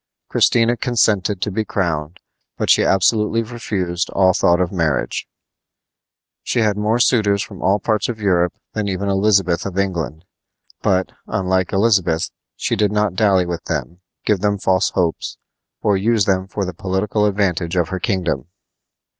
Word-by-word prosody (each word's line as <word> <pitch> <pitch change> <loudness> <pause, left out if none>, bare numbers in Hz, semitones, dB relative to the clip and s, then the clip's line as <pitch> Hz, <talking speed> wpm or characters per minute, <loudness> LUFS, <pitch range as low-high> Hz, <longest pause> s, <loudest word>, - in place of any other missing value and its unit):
Christina 120 0 +3
consented 110 -6 +1
to 105 - -2
be 110 +3 -1
crowned, 85 -4 -2 0.4
but - - +2
she - - +5
absolutely 105 +4 +2
refused 95 -7 -3
all 95 -1 +3
thought 85 0 +3
of 90 -2 0
marriage. 85 -5 -1 1.1
She 120 - 0
had 105 -2 +2
more 105 +3 +1
suitors 105 -5 +2
from 95 -4 -11
all 100 +2 +3
parts 110 +2 0
of 115 -2 -4
Europe 90 -4 +2 0.2
than 105 -1 -2
even 100 +1 -2
Elizabeth 95 -3 +2
of 95 -1 -5
England; 85 -4 -2 0.6
but, 95 -1 +1 0.2
unlike 95 -1 0
Elizabeth, 95 -6 +2 0.2
she - - -1
did 105 -1 +1
not 105 -3 +1
dally 95 -2 +3
with 85 -1 -4
them, 85 - -4 0.3
give 105 -3 +2
them 100 +1 +1
false 95 -1 +2
hopes, 85 -4 -2 0.5
or 105 - +3
use 110 +1 +2
them 95 -1 0
for 100 0 -3
the 90 - -5
political 95 +4 0
advantage 95 -4 0
of 85 -3 +1
her 95 - -3
kingdom. 90 - -1
95 Hz, 155 wpm, -19 LUFS, 90-105 Hz, 1.1 s, she